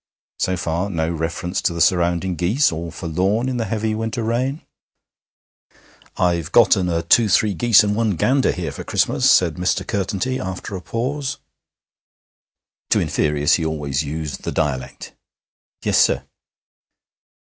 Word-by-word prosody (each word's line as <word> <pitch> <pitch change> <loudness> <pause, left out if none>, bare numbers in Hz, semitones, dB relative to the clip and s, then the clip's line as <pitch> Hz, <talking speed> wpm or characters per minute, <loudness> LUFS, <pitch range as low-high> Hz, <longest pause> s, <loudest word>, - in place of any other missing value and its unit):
So 95 0 0
far 85 +3 -2
no 80 -4 -1
reference 85 +2 -3
to 90 - 0
the 85 - -5
surrounding 85 +1 +2
geese, 100 - +2
all 85 +1 -5
forlorn 95 +9 -1
in 130 -1 -2
the 115 - -1
heavy 110 +1 -2
winter 115 +1 -3
rain. 130 +6 -1 1.5
'I've 85 -4 0
gotten 90 -2 +4
a 85 -1 -1
two 115 -3 +4
three 105 +2 +3
geese 115 +2 +5
and 105 0 0
one 110 -3 0
gander 130 - +2
here 85 -5 -4
for - - -8
Christmas,' - - +1
said 85 -4 +3
Mr. 90 +1 0
Curtenty 100 +6 -2
after 95 +1 -5
a 95 - -6
pause. 130 - -3 1.5
To - - +3
inferiors 75 -1 +1
he 85 - +2
always 75 -3 -2
used 75 -1 -5
the - - -4
dialect. 70 -5 -3 0.7
'Yes, - - +2
sir.' - - +2
90 Hz, 145 wpm, -20 LUFS, 80-110 Hz, 1.5 s, geese